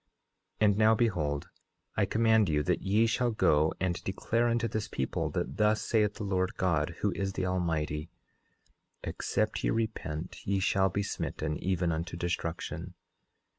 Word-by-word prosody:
10:11 - - +6
And 100 0 +3
now 110 +1 +6
behold, 80 -11 0 0.5
I - - +3
command 110 -3 +3
you, 75 -1 +2
that - - 0
ye 105 +4 +3
shall 120 +2 +1
go 80 -8 +3
and 90 -2 -1
declare 115 +5 0
unto 115 0 +1
this 110 -1 -3
people, 65 - -2
that 70 - -3
thus 105 0 +3
saith 105 -3 +2
the - - -5
Lord 95 -2 0
God, 85 -3 +1
who 105 - +2
is 95 0 -2
the 95 - -2
Almighty: 80 -4 -1 0.9
Except 110 0 -1
ye - - +2
repent 90 -8 -3
ye 100 0 0
shall 95 0 +2
be 100 +2 -1
smitten, 80 -5 -3
even 90 -2 +1
unto 85 +2 -3
destruction. 85 0 -3
95 Hz, 160 wpm, -30 LUFS, 85-110 Hz, 0.9 s, 10:11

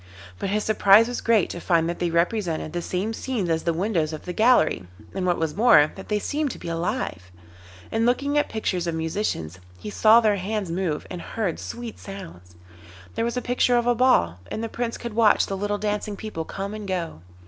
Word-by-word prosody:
But - - -2
his 210 +1 0
surprise 215 +1 +5
was 245 - -4
great 225 -5 +3
to 175 - -6
find 165 -2 +2
that 170 - -3
they 175 - 0
represented 170 -2 0
the 175 - -2
same 190 +6 -2
scenes 225 -8 -2
as 160 0 +1
the 170 - 0
windows 165 -3 -1
of 155 - -7
the 180 - -4
gallery, 215 - +3 0.3
and 185 -1 -2
what 175 - +2
was 160 -2 -1
more, 185 -9 +6
that 190 - -10
they 210 - +1
seemed 295 +7 -1
to - - -7
be - - -7
alive. 165 - -3 0.6
In 225 0 +1
looking 275 +4 +1
at 295 - +2
pictures 185 -5 -2
of 165 - -1
musicians 160 - -3 0.2
he 210 - -7
saw 220 +2 +6
their 215 -3 +2
hands 200 -1 -3
move 170 -4 -2
and 180 - -5
heard 200 -7 -3
sweet 235 -1 -7
sounds; 165 - -10 0.6
there - - -1
was 235 +1 -2
a 250 - -2
picture 245 0 +2
of 240 - +1
a 245 - +4
ball, 225 - +3
and 220 - -4
the 225 - -3
Prince 235 0 -3
could 235 -2 -6
watch 220 -2 +4
the 195 - -4
little 205 +1 -1
dancing 210 0 -2
people 195 -7 -5
come 200 +4 -5
and 215 -1 -6
go. 175 - -3
200 Hz, 215 wpm, -24 LUFS, 170-225 Hz, 0.6 s, more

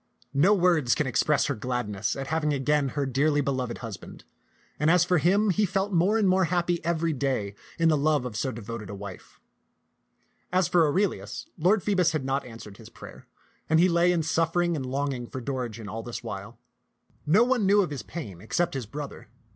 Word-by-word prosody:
No 180 +10 +4
words 170 -9 +3
can 155 - 0
express 130 +4 +2
her 140 - 0
gladness 110 -3 -2
at 135 - -4
having 150 0 0
again 140 +1 +1
her 140 - +1
dearly 145 +3 +1
beloved 130 -4 -2
husband; 100 -4 -9 0.6
and 150 - +2
as 175 0 +5
for 180 -1 +2
him, 200 +5 +3
he 210 +4 +1
felt 195 +1 -1
more 185 +6 +3
and 210 -3 +2
more 185 0 +3
happy 175 0 0
every 165 0 0
day 130 -7 -1 0.2
in 165 - +3
the 160 - +4
love 150 -2 +1
of 120 -4 -6
so 130 +4 -1
devoted 115 -2 -7
a 100 - -6
wife. 100 -2 -10 1.1
As 185 -1 +2
for 170 -3 +4
Aurelius, 190 +7 -1
Lord 185 +4 +2
Phoebus 185 -5 +2
had 150 -4 -2
not 135 +1 -1
answered 115 -4 -11
his - - -13
prayer, - - -13 0.4
and 160 0 +4
he 180 - +6
lay 170 +1 +3
in 170 -2 +1
suffering 165 +2 +1
and 135 -4 -4
longing 135 -2 -2
for 130 - -6
Dorigen 120 -4 -4
all 110 +3 -5
this 120 +1 -7
while. - - -7 0.7
No 195 +10 +5
one 245 -5 +1
knew 205 +1 +5
of 165 - -5
his 140 - -4
pain 105 - -8
except 175 - -1
his 130 -5 -4
bro 145 +6 -5
ther. - - -14
150 Hz, 200 wpm, -26 LUFS, 125-175 Hz, 1.1 s, he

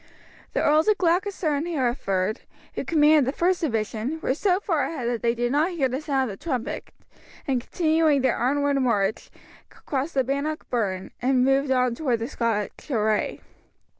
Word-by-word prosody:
The - - 0
Earls 305 +4 +3
of 425 -2 +4
Gloucester 360 0 +1
and 290 +4 -1
Hereford, 235 - -1 0.3
who - - -3
commanded 300 -3 +4
the 265 - -3
first 360 +1 +2
division, 225 +1 -2
were 260 - +1
so 365 +5 +1
far 330 -8 0
ahead 255 -8 -4
that 240 -2 -1
they 235 0 +1
did 240 +1 -1
not 300 +5 +2
hear 285 -6 +1
the 260 +3 -3
sound 280 -3 0
of 195 - -9
the - - -19
trumpet, 255 -8 -3 0.6
and 260 -3 +1
continuing 315 -1 +2
their 260 - +2
onward 280 +3 +1
march 215 -5 0 0.4
crossed 280 +3 -4
the 265 - +3
Bannock 280 +4 -3
Burn 190 -6 -2
and 255 0 +3
moved 270 +1 +2
on 255 -2 +2
toward 250 -2 0
the 230 +1 -4
Scotch 230 -1 -3
array. 215 -4 0
270 Hz, 175 wpm, -25 LUFS, 235-310 Hz, 0.6 s, of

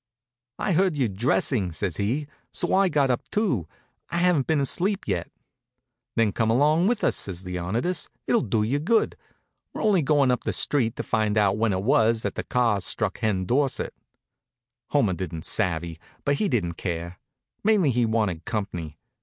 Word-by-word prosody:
"I - - -1
heard 180 -2 +2
you 130 -4 +2
dressing," 100 -1 0
says 80 +1 -3
he, 120 +9 -1 0.3
"so - - -2
I 195 0 +4
got 140 -5 +2
up, 120 - -3
too. 175 - 0 0.4
I 170 - -2
haven't 175 -6 +2
been 160 -2 +2
asleep 185 +8 0
yet." - - -2 0.9
"Then 115 -2 +3
come 110 +2 0
along 150 +9 +3
with 240 0 0
us," - - +2
says 95 -1 -4
Leonidas. 95 - -2 0.2
"It'll 235 - +2
do 110 -3 0
you 130 +7 0
good. 220 +9 +2 0.6
We're - - -4
only 205 -5 +4
going 140 -2 +3
up 125 - -1
the - - -1
street 120 -6 +1
to - - -4
find 110 -1 0
out 100 -2 +3
when 115 0 +1
it 95 0 -1
was 115 -1 +3
that 100 - -2
the - - -4
cars 115 -6 +1
struck - - -1
Hen 95 -4 0
Dorsett." 135 +4 0 0.9
Homer 115 -10 +2
didn't 85 -3 -5
savvy, 85 -5 -1 0.3
but 140 0 +2
he 205 - 0
didn't 85 - -1
care. 85 0 -4 0.4
Mainly 205 -9 +3
he 120 0 +1
wanted 105 -7 0
comp'ny. 90 -9 -4
115 Hz, 175 wpm, -25 LUFS, 95-145 Hz, 0.9 s, I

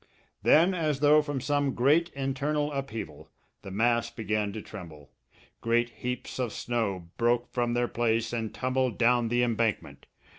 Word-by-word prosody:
Then, 170 +5 +5
as 155 -5 -1
though 150 +1 +6
from 145 -2 -3
some 145 0 0
great 150 +7 +3
internal 140 +2 -1
upheaval, 115 - -6 0.3
the - - -9
mass 115 +3 +1
began 105 -2 -2
to 110 - -5
tremble. 80 -8 -11 0.5
Great 120 +1 +1
heaps 125 +3 -5
of 120 -4 -1
snow 100 -8 -2
broke 120 +1 +1
from 120 -1 0
their 120 0 +1
place 115 -1 0
and 115 -2 -2
tumbled 130 -2 -1
down 120 0 +3
the 120 +2 +2
embankment. 115 -2 -1
120 Hz, 150 wpm, -28 LUFS, 110-135 Hz, 0.5 s, though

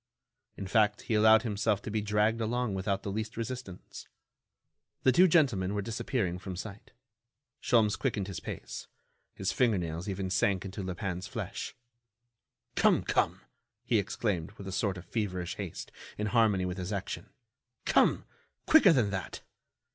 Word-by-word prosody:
In 100 - -5
fact, 105 +1 +2
he - - -3
allowed 110 +1 +6
himself 105 -2 0
to 105 - -5
be 110 0 0
dragged 105 +2 +1
along 120 0 0
without 95 +1 -1
the 100 - -3
least 110 +2 -4
resistance. 115 -5 -6 1.0
The 130 - +6
two 180 +9 +6
gentlemen 120 - +3
were 100 - 0
disappearing 110 -4 -2
from 95 0 -6
sight. 100 +3 -8 0.7
Sholmes 110 -4 +3
quickened 105 -8 -1
his 95 -6 -5
pace. - - -7 0.5
His 95 0 -1
finger 120 -5 +3
nails 85 +2 -4
even 95 -1 -3
sank 100 -2 +1
into 95 +1 -5
Lupin's 95 0 -4
flesh. - - -5 1.0
"Come! - - +4
Come!" - - +1 0.4
he 120 -3 +2
exclaimed, 100 -3 -2
with 100 -2 -10
a - - -4
sort 95 0 -1
of 90 - -9
feverish 95 -6 -3
haste, - - -6 0.3
in 105 - -1
harmony 105 -4 +3
with 90 +1 -3
his 90 +2 -4
action. 100 -2 -4 0.6
"Come! - - +3 0.4
quicker 215 - +7
than 115 -8 +2
that." 95 -2 -4
100 Hz, 155 wpm, -30 LUFS, 95-110 Hz, 1.0 s, quicker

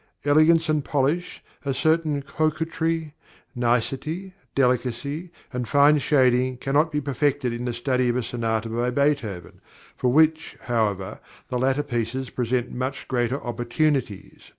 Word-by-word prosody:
Elegance 155 +3 +5
and 155 -2 +1
polish, 145 +6 -1 0.2
a 140 -2 -1
certain 155 0 +1
coquetry, 160 +1 -1 0.4
nicety, 135 - -1 0.2
delicacy, 135 +5 0 0.2
and 125 -2 -3
fine 145 +3 +5
shading 130 -2 +2
cannot 145 +5 +1
be 150 - 0
perfected 140 -2 0
in 120 +1 -4
the 120 - -1
study 125 +1 0
of 120 - 0
a 125 - -1
sonata 115 -1 -2
by 120 +2 -1
Beethoven; 125 - -1 0.3
for 125 - +1
which, 160 +3 +2
however, 105 -6 -1 0.3
the 125 - -1
latter 135 +3 +1
pieces 125 -1 -3
present 125 0 -1
much 130 +2 -4
greater 125 +1 0
opportunities. 120 -1 -2
130 Hz, 130 wpm, -24 LUFS, 120-150 Hz, 0.4 s, Elegance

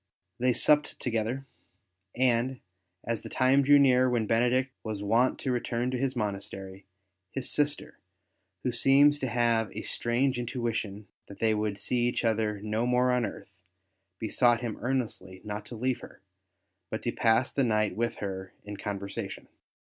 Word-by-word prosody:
They 125 +1 +3
supped 150 +4 +3
together, 120 +3 -2 0.7
and, 125 +1 +1 0.4
as 115 -1 -2
the - - -8
time 130 +2 +3
drew 145 +1 +6
near 130 -2 +5
when 120 -3 +1
Benedict 125 +4 +2
was 105 -2 -4
wont 115 +5 +2
to 130 - -1
return 120 0 -1
to 130 - -1
his 135 0 -1
monastery, 100 -3 -5 0.5
his 135 -2 -2
sister, 145 0 -1 0.6
who 125 - 0
seems 140 +4 +5
to 130 - -1
have 115 -3 +1
a - - -4
strange 125 +2 0
intuition 115 -4 -3 0.2
that 100 - -11
they 110 -1 +2
would 105 -1 -1
see 120 +4 0
each 120 - -1
other 110 -2 0
no 110 +3 -1
more 125 +1 +3
on 125 -2 +1
earth, - - -10 0.7
besought 120 +2 +2
him 115 -3 -4
earnestly 115 -8 -2
not 105 0 -6
to 120 - -8
leave 125 +2 -1
her, - - -13 0.7
but - - -4
to - - 0
pass 115 +3 +2
the 140 - +2
night 110 -4 +1
with 115 +2 -1
her 95 -2 -5
in 105 0 -7
conversation. 100 -1 -5
120 Hz, 160 wpm, -29 LUFS, 105-130 Hz, 0.7 s, drew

